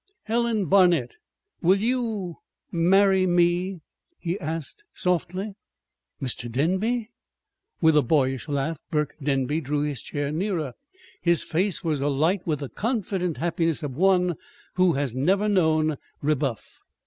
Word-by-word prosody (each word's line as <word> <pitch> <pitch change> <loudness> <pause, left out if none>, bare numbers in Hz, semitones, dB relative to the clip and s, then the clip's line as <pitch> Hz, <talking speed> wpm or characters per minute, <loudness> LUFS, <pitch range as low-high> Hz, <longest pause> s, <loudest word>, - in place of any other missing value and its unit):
"Helen 230 -2 0
Barnet, 175 -8 +4 0.5
will 185 +3 +4
you 220 -6 -1 0.3
marry 190 +2 +4
me?" 175 +1 +1 0.4
he 175 +3 -3
asked 160 - -5
softly. 185 +3 -1 0.7
"Mr. 120 -3 -3
Denby!" 195 - 0 0.7
With 160 -2 +5
a 150 - +6
boyish 135 -1 +1
laugh 145 +2 -2
Burke 150 -2 0
Denby 140 +2 0
drew 145 0 -1
his 145 -5 -2
chair 145 -1 -3
nearer. 160 - -2 0.5
His 170 -1 +3
face 185 +3 0
was 155 -4 0
alight 155 +7 +1
with 150 -3 -1
the 140 - -4
confident 195 - -2
happiness 165 -1 0
of 145 - -3
one 180 0 +3 0.4
who 180 -2 +3
has 140 -3 -1
never 190 +10 +2
known 155 -6 +2 0.2
rebuff. 140 -5 -2
170 Hz, 125 wpm, -25 LUFS, 145-190 Hz, 0.7 s, a